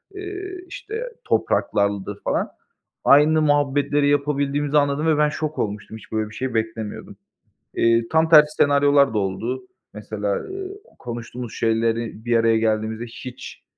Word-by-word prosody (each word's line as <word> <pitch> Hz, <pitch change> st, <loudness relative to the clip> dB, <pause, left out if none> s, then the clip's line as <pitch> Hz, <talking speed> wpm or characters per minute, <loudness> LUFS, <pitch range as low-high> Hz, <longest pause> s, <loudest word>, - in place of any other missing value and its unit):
eee, 385 Hz, -1 st, -6 dB, 0.2 s
işte 460 Hz, -1 st, -6 dB, 0.2 s
topraklardır 100 Hz, 0 st, 0 dB
falan. -, -, -1 dB, 0.6 s
Aynı 155 Hz, +2 st, +6 dB
muhabbetleri 145 Hz, -1 st, +2 dB
yapabildiğimizi 145 Hz, 0 st, +1 dB
anladım 145 Hz, +2 st, +1 dB
ve 155 Hz, -, +3 dB
ben 150 Hz, 0 st, +3 dB
şok 155 Hz, 0 st, -4 dB
olmuştum. 105 Hz, +1 st, -4 dB
Hiç -, -, -16 dB
böyle 110 Hz, -1 st, -1 dB
bir 110 Hz, -, -13 dB
şey 130 Hz, +1 st, -3 dB
beklemiyordum. 110 Hz, -1 st, -4 dB, 0.6 s
Eee, 115 Hz, 0 st, +3 dB
tam 160 Hz, 0 st, +2 dB
tersi 150 Hz, -1 st, +7 dB
senaryolar 145 Hz, -2 st, +4 dB
da -, -, 0 dB
oldu. 110 Hz, -, -3 dB, 0.3 s
Mesela, 105 Hz, -1 st, -3 dB
ııı, 385 Hz, 0 st, -6 dB, 0.3 s
konuştuğumuz 120 Hz, 0 st, -7 dB
şeyleri 115 Hz, 0 st, -1 dB
bir 120 Hz, -1 st, +3 dB
araya 115 Hz, 0 st, +3 dB
geldiğimizde 110 Hz, +1 st, -1 dB
hiç, 125 Hz, +2 st, -10 dB
130 Hz, 135 wpm, -22 LUFS, 110-150 Hz, 0.6 s, tersi